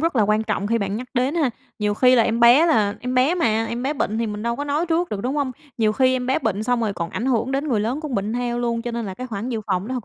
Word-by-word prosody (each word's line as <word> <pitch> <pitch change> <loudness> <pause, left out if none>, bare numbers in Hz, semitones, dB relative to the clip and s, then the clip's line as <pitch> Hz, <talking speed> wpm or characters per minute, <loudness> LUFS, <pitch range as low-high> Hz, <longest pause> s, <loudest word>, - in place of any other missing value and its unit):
rất 330 -2 0
là 220 - +4
quan 215 +1 +2
trọng 210 -2 -2
khi 230 +2 +1
bạn 200 0 -2
nhắc 250 +3 -6
đến 255 +5 +1
ha. 300 -7 +1 0.3
Nhiều 210 -1 0
khi 255 +3 +5
là 235 - +5
em 230 +1 0
bé 245 +8 +7
là 210 -11 +2
em 250 +1 -3
bé 265 +7 +3
mà, 225 -10 +1
em 235 +2 -4
bé 275 +3 0
bệnh 220 -5 -1
thì 230 - 0
mình 210 0 -5
đâu 235 0 -1
có 285 - -3
nói 295 +4 0
trước 340 +1 0
được, 200 - -4
đúng 260 +4 -2
hông? 280 -3 -1 0.3
Nhiều 215 -1 +3
khi 260 +2 +3
em 250 -1 -3
bé 265 - +2
bệnh 215 -1 -1
xong 245 +1 0
rồi 215 -3 0
còn 170 -2 -4
ảnh 240 - -3
hưởng 250 0 0
đến 280 +3 -1
người 225 -5 +1
lớn 240 +8 -2
cũng 305 -5 -5
bệnh 205 +2 -1
theo 240 0 -2
luôn, 235 -1 -1
cho 240 - -4
nên 230 -2 -3
là 190 - -5
cái 255 +5 -6
khoản 220 +1 -5
dự 230 -3 -2
phòng 190 +1 -1
nó 260 - -3
thực 245 -5 -4
235 Hz, 335 wpm, -22 LUFS, 215-260 Hz, 0.3 s, bé